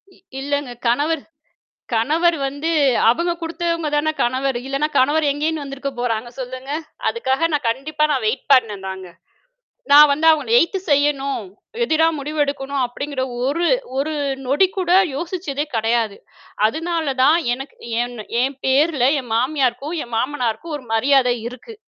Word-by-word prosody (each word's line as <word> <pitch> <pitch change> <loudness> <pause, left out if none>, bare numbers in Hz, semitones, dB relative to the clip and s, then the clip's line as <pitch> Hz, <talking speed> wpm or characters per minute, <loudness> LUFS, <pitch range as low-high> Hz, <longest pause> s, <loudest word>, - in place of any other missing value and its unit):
இ - - -23 0.2
இல்லங்க, 285 -2 -2 0.2
கணவர் 290 +5 +1 0.7
கணவர் 320 +8 +2
வந்து, 285 +4 -3 0.4
அவுங்க 340 +8 +1
குடுத்தவங்கதானே 325 -2 -1
கணவர். 260 +1 0
இல்லன்னா 275 +3 0
கணவர் 295 +4 +3
எங்கேருந்து 300 +1 -2
வந்திருக்கப்போறாங்க? 245 -4 -3
சொல்லுங்க! 255 +2 -6 0.4
அதுக்காக 330 - 0
நான் 285 -5 0
கண்டிப்பா 300 +5 -2
நான் 260 -5 0
வெயிட் 225 - -2
பண்னேன்தாங்க. 190 -6 0 0.8
நான் 295 +1 +9
வந்து 310 +3 0
அவங்கள 315 +7 +1
எதுத்து 380 +3 +1
செய்யணும், 280 -4 +1 0.4
எதிரா 320 -4 +3
முடிவு 300 +2 -5
எடுக்கணும், 280 -1 -3
அப்படிங்கிற 270 +2 -4 0.2
ஒரு 335 +5 0 0.3
ஒரு 310 +3 -1 0.3
நொடி 290 +9 +4
கூட 360 -2 0 0.2
யோசிச்சதே 330 -3 -3
கிடையாது. 225 -2 0 0.5
அதுனாலதான் 315 0 +1 0.2
எனக்கு 270 +3 -9 0.3
ஏன்ன 240 -3 -6 0.2
என் 270 +1 -1
பேருல 275 -1 +3
என் 240 -3 -8
மாமியாருக்கும், 270 +4 0
என் 235 -1 -8
மாமனாருக்கும் 260 +4 -2
ஒரு 260 - -11
மரியாதை 250 +1 +3
இருக்கு. 255 - -11
280 Hz, 125 wpm, -20 LUFS, 250-310 Hz, 0.8 s, நான்